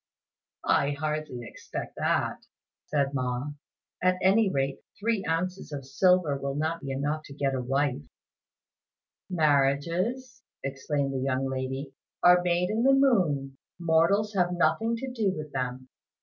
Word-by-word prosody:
"I 140 Hz, +1 st, +3 dB
hardly 155 Hz, -5 st, -3 dB
expect -, -, -7 dB
that," -, -, 0 dB, 0.4 s
said 140 Hz, -2 st, 0 dB
Ma; 130 Hz, +1 st, -2 dB, 0.5 s
"at 185 Hz, 0 st, +3 dB
any 195 Hz, +3 st, +4 dB
rate 135 Hz, -4 st, -1 dB, 0.2 s
three 220 Hz, -1 st, 0 dB
ounces 180 Hz, +1 st, -2 dB
of 140 Hz, -2 st, -5 dB
silver 155 Hz, +2 st, +3 dB
will 140 Hz, 0 st, -3 dB
not 160 Hz, +3 st, -1 dB
be 135 Hz, -, -6 dB
enough 145 Hz, +3 st, -1 dB
to 140 Hz, -, -11 dB
get 140 Hz, -1 st, 0 dB
a 130 Hz, -, -1 dB
wife." 135 Hz, -, 0 dB, 1.3 s
"Marriages," 170 Hz, -, +1 dB, 0.2 s
explained 135 Hz, +1 st, -2 dB
the 135 Hz, -, -1 dB
young 135 Hz, 0 st, 0 dB
lady, 135 Hz, +1 st, -3 dB, 0.3 s
"are 180 Hz, 0 st, +7 dB
made 180 Hz, +1 st, +1 dB
in 220 Hz, +2 st, 0 dB
the 270 Hz, +2 st, +5 dB
moon; 165 Hz, -, +2 dB, 0.2 s
mortals 175 Hz, +6 st, +2 dB
have 180 Hz, -2 st, +2 dB
nothing 225 Hz, +6 st, +2 dB
to 260 Hz, +3 st, -5 dB
do 210 Hz, -6 st, 0 dB
with 150 Hz, -1 st, -6 dB
them." 130 Hz, -1 st, -3 dB
150 Hz, 140 wpm, -28 LUFS, 135-185 Hz, 1.3 s, are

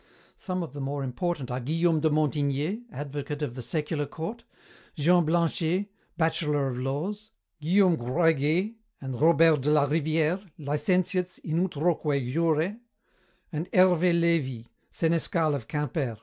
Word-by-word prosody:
Some 185 Hz, -2 st, -3 dB
of 155 Hz, -, -8 dB
the 145 Hz, -, -6 dB
more 140 Hz, +1 st, -3 dB
important 135 Hz, +1 st, -3 dB
are 125 Hz, -, -2 dB
Guillaume 160 Hz, +5 st, +1 dB
de 155 Hz, +1 st, +2 dB
Montigné, 150 Hz, -, 0 dB
advocate 145 Hz, 0 st, -5 dB
of 125 Hz, -, -3 dB
the 125 Hz, -, -6 dB
secular 150 Hz, +4 st, -2 dB
court; 210 Hz, +12 st, -6 dB, 0.5 s
Jean 175 Hz, +3 st, +4 dB
Blanchet, 170 Hz, +4 st, 0 dB, 0.3 s
bachelor 150 Hz, -4 st, +1 dB
of 125 Hz, -1 st, -4 dB
laws; 175 Hz, +12 st, -3 dB, 0.3 s
Guillaume 180 Hz, +2 st, +4 dB
Groyguet 160 Hz, -, +1 dB, 0.3 s
and 130 Hz, -1 st, -6 dB
Robert 160 Hz, -2 st, +5 dB
de 145 Hz, -, 0 dB
la 150 Hz, -1 st, +4 dB
Rivière, 160 Hz, +4 st, +1 dB
licentiates 180 Hz, +5 st, 0 dB
in 165 Hz, +2 st, 0 dB
utroque 150 Hz, -2 st, 0 dB
jure, 165 Hz, +5 st, +1 dB, 0.8 s
and 155 Hz, +3 st, -3 dB
Hervé 180 Hz, -2 st, +4 dB
Lévi, 145 Hz, -9 st, 0 dB, 0.2 s
senescal 165 Hz, -1 st, +1 dB
of 135 Hz, -6 st, -4 dB
Quimper. 150 Hz, -5 st, -2 dB
155 Hz, 135 wpm, -27 LUFS, 145-170 Hz, 0.8 s, Robert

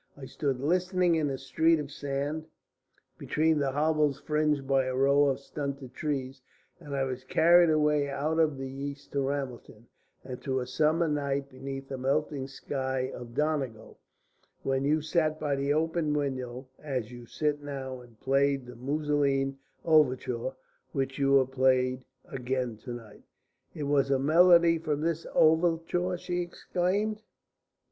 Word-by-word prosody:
I 140 Hz, -, -8 dB
stood 135 Hz, -1 st, -2 dB
listening 180 Hz, +4 st, +2 dB
in 160 Hz, -2 st, +1 dB
the 135 Hz, -1 st, -2 dB
street 160 Hz, +5 st, +2 dB
of 145 Hz, -1 st, -5 dB
sand, 145 Hz, +3 st, -3 dB, 0.7 s
between 155 Hz, 0 st, +1 dB
the 140 Hz, -2 st, 0 dB
hovels 150 Hz, -1 st, +1 dB
fringed 150 Hz, -2 st, 0 dB
by 135 Hz, -1 st, +3 dB
a 130 Hz, 0 st, -2 dB
row 140 Hz, +2 st, +4 dB
of 135 Hz, -2 st, +1 dB
stunted 140 Hz, -2 st, -6 dB
trees, 135 Hz, -3 st, -3 dB, 0.4 s
and 145 Hz, -4 st, -6 dB
I 135 Hz, -, +1 dB
was 130 Hz, -1 st, -4 dB
carried 170 Hz, +4 st, +5 dB
away 150 Hz, -2 st, +2 dB
out 150 Hz, +4 st, -1 dB
of 155 Hz, -4 st, +2 dB
the 135 Hz, 0 st, -4 dB
East 140 Hz, +1 st, -7 dB
to 140 Hz, -, -1 dB
Ramelton 135 Hz, -5 st, -4 dB, 0.4 s
and 130 Hz, -1 st, -7 dB
to 130 Hz, -1 st, -1 dB
a 125 Hz, -, -3 dB
summer 155 Hz, +6 st, +2 dB
night 140 Hz, -2 st, -1 dB
beneath 135 Hz, +1 st, -7 dB
a 135 Hz, -, -4 dB
melting 140 Hz, +1 st, -1 dB
sky 130 Hz, -1 st, -3 dB
of 120 Hz, -1 st, -9 dB
Donegal, 140 Hz, -7 st, -2 dB, 0.6 s
when 135 Hz, 0 st, 0 dB
you 155 Hz, +2 st, +2 dB
sat 155 Hz, -1 st, +1 dB
by 145 Hz, -2 st, 0 dB
the 140 Hz, +1 st, -1 dB
open 160 Hz, 0 st, +1 dB
window 130 Hz, -3 st, -3 dB
as 130 Hz, -6 st, -4 dB
you 120 Hz, -1 st, -10 dB
sit 150 Hz, +2 st, -1 dB
now 135 Hz, -3 st, -6 dB
and 120 Hz, -3 st, -18 dB
played 135 Hz, 0 st, +1 dB
the 125 Hz, -, -10 dB
Musoline 140 Hz, 0 st, 0 dB, 0.3 s
Overture, 130 Hz, -5 st, +2 dB, 0.4 s
which 135 Hz, 0 st, -2 dB
you 140 Hz, 0 st, +4 dB
have 130 Hz, -1 st, +3 dB
played 130 Hz, -1 st, +2 dB, 0.2 s
again 125 Hz, -2 st, -3 dB
to 120 Hz, +2 st, -7 dB
night." 115 Hz, -3 st, -11 dB, 0.5 s
"It 150 Hz, -, -4 dB
was 140 Hz, -1 st, +2 dB
a 135 Hz, -, +3 dB
melody 170 Hz, +3 st, +5 dB
from 150 Hz, -2 st, -2 dB
this 165 Hz, 0 st, -1 dB
overture?" 165 Hz, +2 st, +2 dB
she 175 Hz, 0 st, -2 dB
exclaimed. 190 Hz, +5 st, -1 dB
140 Hz, 155 wpm, -29 LUFS, 130-155 Hz, 0.7 s, carried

